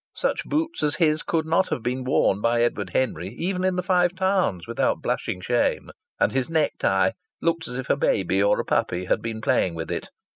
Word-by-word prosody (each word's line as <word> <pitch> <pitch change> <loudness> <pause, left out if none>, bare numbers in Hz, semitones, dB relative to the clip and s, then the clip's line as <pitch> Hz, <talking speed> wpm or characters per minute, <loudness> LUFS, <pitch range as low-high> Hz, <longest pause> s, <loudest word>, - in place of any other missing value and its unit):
Such - - -1
boots 320 +3 -1
as 150 -1 +1
his 155 -2 +2
could 160 -2 -1
not 165 +4 +2
have 115 - -3
been 125 +2 -2
worn 115 -6 +2
by 115 +1 +2
Edward 105 -5 -1
Henry 95 -9 -1
even 180 +1 -2
in 185 -1 +1
the 180 - -1
Five 180 -1 +2
Towns 190 - +1
without - - 0
blushing 90 - -2
shame, 120 +5 0 0.3
and - - +3
his 130 +1 -1
necktie 160 -2 +2 0.3
looked 165 -1 0
as 125 - -5
if 130 - -5
a - - +3
baby 95 -8 +1
or 100 - +3
a - - -2
puppy 90 +1 0
had - - +1
been 115 -1 -4
playing 90 -5 +1
with 80 0 -5
it. - - -4
130 Hz, 210 wpm, -24 LUFS, 110-180 Hz, 0.3 s, and